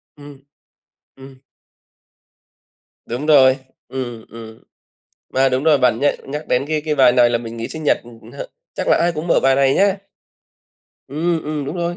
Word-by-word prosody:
Ừm. 145 -2 -13 0.8
Ừm. 135 0 -14 1.7
Đúng 125 +5 -5
rồi, 135 -4 +5 0.3
ừm, 120 -4 -6
ừm. 110 -1 -12 0.7
Mà 135 +1 +3
đúng 130 +2 -1
rồi, 155 -3 +4
bạn 125 -3 +2
nh 145 -1 -1
nhắc 150 +1 -5
đến 125 +2 +1
cái 155 -1 -1
cái 150 - 0
bài 130 -3 +5
này 120 -1 +4
là 120 - +1
mình 115 0 -8
nghĩ 115 - -4
sinh 160 -1 -8
nhật, - - +3
ừm, 115 -1 -15
hơ, - - -7 0.3
chắc - - -4
là - - +4
ai 175 - +1
cũng 160 +1 -6
mở - - +3
bài 135 0 +4
này 135 -1 +3
nhá. 200 0 +2 1.1
Ừm, 160 +3 -2
ừm, 150 -1 -3
đúng 145 +6 -5
rồi. 175 0 -2
135 Hz, 180 wpm, -19 LUFS, 125-155 Hz, 1.7 s, rồi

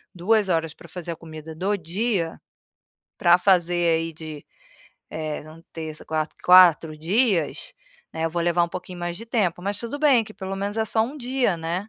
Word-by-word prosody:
2 200 +2 +2
horas 165 -2 0
para 170 - -15
fazer 170 0 -6
a - - -4
comida 160 -1 -10
do 200 +5 0
dia, 180 0 -2 0.8
para 175 0 +6
fazer 175 -3 +3
aí 165 0 -4
de, 155 -2 -9 0.7
eh, 155 -2 -4 0.3
terça, 160 -1 -7
quarta, 155 0 -3
4 170 -4 +6
dias, 185 - 0 0.4
né, 160 0 -1
eu 165 - -3
vou 170 0 -1
levar 175 0 +2
um 170 - -6
pouquinho 180 0 -7
mais 175 0 -3
de 230 - -8
tempo, 190 -7 -1
mas 200 +1 -2
tudo 235 +6 -5
bem 275 -6 +5
que 215 - -13
pelo 190 0 -5
menos 200 +2 -3
é 220 - +1
só 220 0 +2
um 260 +7 -4
dia, 250 -7 0
né. 170 +5 -4
175 Hz, 185 wpm, -24 LUFS, 165-205 Hz, 0.8 s, para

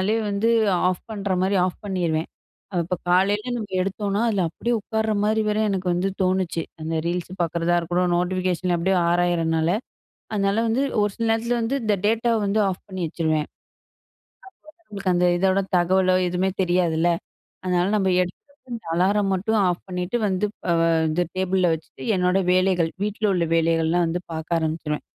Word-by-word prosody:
அதே 210 +4 +1
வந்து 200 +3 +1 0.4
ஆஃப் 185 -1 -2
பண்ணுற 200 -2 -2
மாரி 195 +1 +1
ஆஃப் 185 - -4
பண்ணிடுவேன். 170 -5 -1 0.6
இப்போ 180 +2 -2
காலையில 205 +6 +2
நம்ம 220 -3 -4 0.2
எடுத்தோம்னா 200 +2 -1
அதில 200 -4 +1
அப்படியே 240 +8 -2
உட்கார்ற 220 0 -1
மாதிரி 220 +1 +2
வர்ற 210 +1 +1
எனக்கு 190 -1 -2
வந்து 180 +2 0
தோணுச்சு. 185 -2 0 0.2
அந்த 160 +1 -3
Reels 175 0 -2
பார்க்குறதா 170 +1 0
இருக்கட்டும். 175 +1 0
நோட்டிஃபிகேஷன் 180 0 0
அப்படியே 190 +3 +1
ஆராயிதுறனால 170 -2 +1 0.6
அதனால 200 +1 +1
வந்து 235 +5 +1 0.2
ஒரு 205 0 +2
சில 230 - -1
நேரத்தில 230 +2 +1
வந்து 230 +4 -1
இந்த 215 -1 +2
டேட்டாவ 230 +2 +2
வந்து 200 +2 +1
ஆஃப் 185 - -4
பண்ணி 190 -2 -5
வச்சுடுவேன். 155 -1 -1
அப்போ - - -69 1.2
தான் 335 - -34
நம்மளுக்கு 195 -3 -2
அந்த 180 0 +3
இதோட 190 +1 +2 0.2
தகவலோ, 185 +1 +3
எதுவுமே 180 +2 0
தெரியாதுல்ல. 175 -2 +2 0.6
அதனால 180 -1 +1
நம்ம 195 -2 +1
எடுக்கிற 255 +7 -8 0.2
அலாரம் 195 +3 +2
மட்டும் 215 +4 0
ஆஃப் 175 -1 -2
பண்ணிட்டு 180 +4 -2
வந்து 190 +1 0 0.6
இந்த 155 +3 +1
டேபிள்ல 185 0 +1
வச்சுட்டு 160 0 -11
என்னோடய 180 0 +1
வேலைகள், 185 -3 +2
வீட்டல 210 +1 -1
உள்ள 175 -2 +1
வேலைகள்லாம் 165 +1 +2
வந்து 170 +2 -2
பார்க்க 160 +1 -1
ஆரம்பிச்சுருவேன். 155 -1 -3
185 Hz, 155 wpm, -23 LUFS, 175-205 Hz, 1.2 s, அந்த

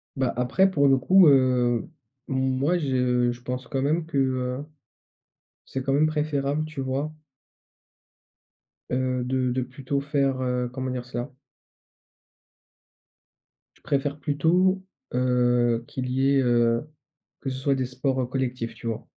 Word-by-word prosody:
Bah 130 -2 0
après 155 +10 +3
pour 140 -5 +3
le 135 - +6
coup, 185 +7 +6
heu, 125 -4 +3 0.4
moi 130 +5 +1
je 125 -5 +1
je 120 - -14
pense 125 0 -5
quand 135 - -2
même 155 +4 +1
que, 160 -3 -4
heu, 130 0 0 1.0
c'est 135 - -4
quand 135 - -1
même 145 +3 +4
préférable, 150 -1 -1
tu 155 -2 -6
vois? 135 +3 -2 1.8
Heu, 130 0 0
de 130 0 0
de 130 +1 0
plutôt 135 +2 -3
faire, 140 -2 0
heu, 125 -1 -1
comment 130 0 -3
dire 125 -1 -4
cela? 120 0 -5 2.5
Je - - -26
préfère 140 +1 -1
plutôt, 175 +7 +2 0.3
heu, 120 -2 +2
qu'il 125 -1 -4
y 135 +2 +2
ait, 140 - +4
heu 120 -2 +3 0.6
que 135 - -3
ce 130 - -4
soit 135 +1 +1
des 130 -1 -1
sports, 130 +1 -1
heu, - - 0
collectifs, 125 -2 -3
tu 115 - -8
vois? 115 -2 -3
130 Hz, 145 wpm, -25 LUFS, 125-140 Hz, 2.5 s, le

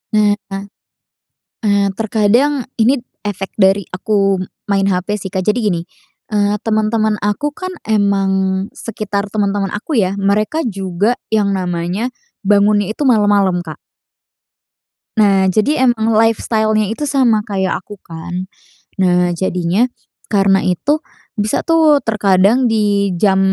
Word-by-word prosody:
Nah, 210 -1 +3 1.3
nah 200 -1 +2
terkadang 230 +5 +1
ini 245 +4 +3 0.2
efek 195 -1 -5
dari 195 -2 +3
aku 195 +1 0 0.3
main 195 -1 +2
HP 180 0 -1
sih, 190 -2 -7
Kak. 190 - -1
Jadi 210 - +2
gini, 175 -5 +1 0.5
eee, 205 -1 +1
temen-temen 215 -1 0
aku 210 +8 0
kan 370 0 -5 0.2
emang 200 -2 +2 0.4
sekitar 205 -3 -4
temen-temen 200 -2 -1
aku 240 +8 -3
ya, 195 -4 +2
mereka 210 +10 +1
juga 195 +3 -1 0.2
yang 200 -3 +2
namanya 180 +6 -2 0.3
bangunnya 205 0 +3
itu 295 - -5
malam-malam, 205 -6 +2
Kak. 155 -2 -8 1.4
Nah. 195 -3 +4
Jadi 245 +10 +1
emang 230 -3 +2
lifestyle-nya 220 -1 +1
itu 295 - -6
sama 240 -6 +3
kayak 190 -4 -2
aku 205 +1 -11
kan. 175 +2 -6 0.5
Nah, 180 -1 +2
jadinya 180 +3 0 0.5
karena 195 -1 +3
itu 285 - 0 0.4
bisa 210 +1 0
tuh 315 -3 +4
terkadang 210 +3 +2
di 205 -3 +1
jam 190 +2 +2
205 Hz, 120 wpm, -16 LUFS, 195-220 Hz, 1.4 s, Nah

